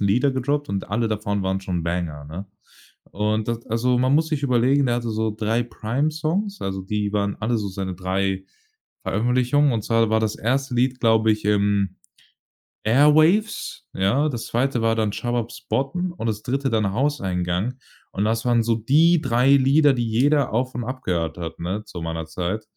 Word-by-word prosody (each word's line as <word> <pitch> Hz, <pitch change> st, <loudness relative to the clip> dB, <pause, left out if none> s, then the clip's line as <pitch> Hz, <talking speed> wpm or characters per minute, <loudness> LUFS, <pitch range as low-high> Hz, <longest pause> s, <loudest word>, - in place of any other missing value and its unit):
Lieder 115 Hz, +8 st, +2 dB
gedroppt 145 Hz, +3 st, -1 dB
und 100 Hz, -2 st, -3 dB
alle 115 Hz, +1 st, 0 dB
davon 100 Hz, -2 st, -2 dB
waren 95 Hz, 0 st, -1 dB
schon 90 Hz, -3 st, -3 dB
banger, 85 Hz, -4 st, -3 dB
ne? 90 Hz, +6 st, -7 dB, 0.6 s
Und 105 Hz, +2 st, -1 dB
da 115 Hz, -1 st, -1 dB
also 125 Hz, +2 st, +1 dB
man 130 Hz, +2 st, +2 dB
muss 160 Hz, +1 st, +2 dB
sich 150 Hz, -3 st, -2 dB
überlegen, 130 Hz, +2 st, +3 dB
der 120 Hz, 0 st, +1 dB
hatte 120 Hz, -1 st, -3 dB
so 110 Hz, 0 st, -1 dB
3 115 Hz, +2 st, 0 dB
Prime 120 Hz, +5 st, -2 dB
Songs, 185 Hz, +7 st, -2 dB
also 95 Hz, 0 st, -3 dB
die 105 Hz, +1 st, -2 dB
waren 100 Hz, -1 st, -1 dB
alle 115 Hz, +2 st, 0 dB
so 100 Hz, -1 st, -3 dB
seine 95 Hz, -1 st, -4 dB
3 95 Hz, +1 st, -2 dB, 0.6 s
Veröffentlichungen. 125 Hz, +5 st, +2 dB
Und 110 Hz, -2 st, -1 dB
zwar 115 Hz, -1 st, +2 dB
war 110 Hz, 0 st, +3 dB
das 110 Hz, -1 st, -1 dB
1. 130 Hz, +2 st, -1 dB
Lied, 125 Hz, +1 st, +1 dB
glaube 110 Hz, -1 st, +4 dB
ich, 105 Hz, -1 st, -4 dB
ähm, 100 Hz, -2 st, +1 dB, 0.9 s
„Airwaves“, 155 Hz, -, +3 dB
ja? 125 Hz, +11 st, +1 dB
Das 120 Hz, -4 st, -5 dB
2. 125 Hz, 0 st, 0 dB
war 115 Hz, 0 st, +2 dB
dann 110 Hz, -2 st, 0 dB
„Shababs 120 Hz, 0 st, -3 dB
botten“ 175 Hz, +7 st, -1 dB
und 145 Hz, -10 st, -5 dB
das 110 Hz, -1 st, -2 dB
3. 135 Hz, +2 st, -1 dB
dann 110 Hz, -4 st, +1 dB
„Hauseingang“. 95 Hz, -5 st, -1 dB, 0.4 s
Und 100 Hz, -, -1 dB
das 115 Hz, +3 st, 0 dB
waren 120 Hz, -1 st, +3 dB
so 115 Hz, 0 st, +1 dB
die 155 Hz, +9 st, +3 dB
3 125 Hz, +2 st, +2 dB
Lieder, 140 Hz, +2 st, +4 dB
die 120 Hz, -2 st, -1 dB
jeder 140 Hz, +5 st, +2 dB
auf 130 Hz, +3 st, -1 dB
und 120 Hz, -, -3 dB
abgehört 90 Hz, -, -3 dB
hat, 80 Hz, -1 st, -6 dB
ne, 95 Hz, +5 st, -3 dB
zu 85 Hz, -, -8 dB
meiner 80 Hz, 0 st, -4 dB
Zeit. 90 Hz, +6 st, -3 dB
115 Hz, 180 wpm, -23 LUFS, 100-130 Hz, 0.9 s, glaube